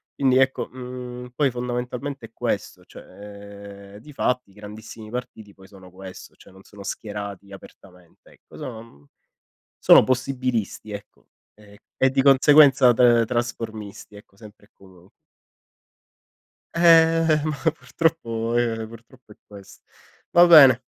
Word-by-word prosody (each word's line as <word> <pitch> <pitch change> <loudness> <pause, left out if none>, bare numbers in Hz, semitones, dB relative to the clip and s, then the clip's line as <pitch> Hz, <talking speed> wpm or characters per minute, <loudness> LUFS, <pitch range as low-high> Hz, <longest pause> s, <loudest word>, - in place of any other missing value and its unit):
quindi 130 -2 +1
ecco, 130 0 0
mhmm, 125 -1 -9
poi 140 -1 +1
fondamentalmente 125 +1 -6
è - - -37
questo, - - -5
cioè, - - -14
ehm, 100 -1 -13
difatti 125 -2 -4
i - - -24
grandissimi 105 +1 -12
partiti 110 -4 -9
poi 95 -1 -19
sono 95 -2 -17
questo, 95 0 -12
cioè - - -20
non 95 - -18
sono 100 -1 -14
schierati 100 -2 -8
apertamente, 90 -3 -17
ecco, - - -21
sono 130 -7 -8
uhm, 75 -11 -18 0.7
sono - - +6
possibilisti 125 -4 -3
ecco, 100 0 -12 0.3
ehm, 105 -1 -19 0.2
e 130 - +2
di 135 +1 0
conseguenza 135 -1 +5
tr 120 -1 +3
trasformisti 110 -4 -6
ecco, 100 -1 -18
sempre 105 -1 -17
e - - -37
comun 95 -2 -20 1.7
Ehm, 165 -2 +3
ma 140 -3 -1
purtroppo 120 -5 -3
ehm, 115 -2 -1
purtroppo 115 +1 -17
è - - -37
questo. 100 -2 -15 0.5
Va 175 0 +6
bene. 135 -7 +7
115 Hz, 130 wpm, -22 LUFS, 100-130 Hz, 1.7 s, bene